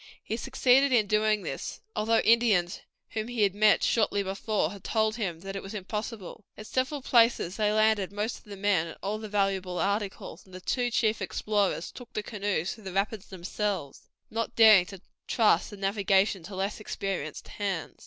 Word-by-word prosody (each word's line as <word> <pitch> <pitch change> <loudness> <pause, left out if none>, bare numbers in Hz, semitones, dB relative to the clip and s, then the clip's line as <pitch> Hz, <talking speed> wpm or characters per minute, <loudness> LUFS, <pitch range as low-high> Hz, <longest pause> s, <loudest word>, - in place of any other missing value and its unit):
He 220 - -3
succeeded 265 +2 +3
in 230 -4 +4
doing 215 0 +2
this, - - -5 0.2
although 225 +1 +2
Indians 215 -7 +3 0.3
whom 220 0 -3
he 240 -3 0
had 200 -2 +3
met 210 +1 +4
shortly 210 -3 +2
before 195 -2 -1
had 200 -2 -11
told 220 -1 +1
him 175 -7 -3
that 195 +1 -7
it 195 - -4
was 195 +3 -8
impossible. 210 0 -6
At 215 - -9
several 260 +4 -2
places 230 -7 +3
they 210 -1 +2
landed 215 -3 +2
most 210 +3 -3
of - - -26
the 205 -1 -9
men 195 -4 +1
and 165 - -9
all 205 +2 -2
the 215 -1 -7
valuable 195 -3 0
articles, 200 -3 -2
and 185 -1 -15
the - - -7
two 245 +6 -1
chief 220 -1 +1
explorers 205 -5 -1
took 245 -3 -12
the 215 - -2
canoes 205 -5 -2
through 215 -2 -15
the 190 - -6
rapids 200 +1 -1
themselves, 190 -4 -4 0.2
not 230 +1 -3
daring 215 -5 +7
to 195 -3 -10 0.3
trust 210 -7 +3
the 205 - -10
navigation 195 0 +1
to 195 +2 -8
less 195 +3 -2
experienced 195 -7 -4
hands. 195 -5 -4
205 Hz, 185 wpm, -28 LUFS, 195-220 Hz, 0.3 s, daring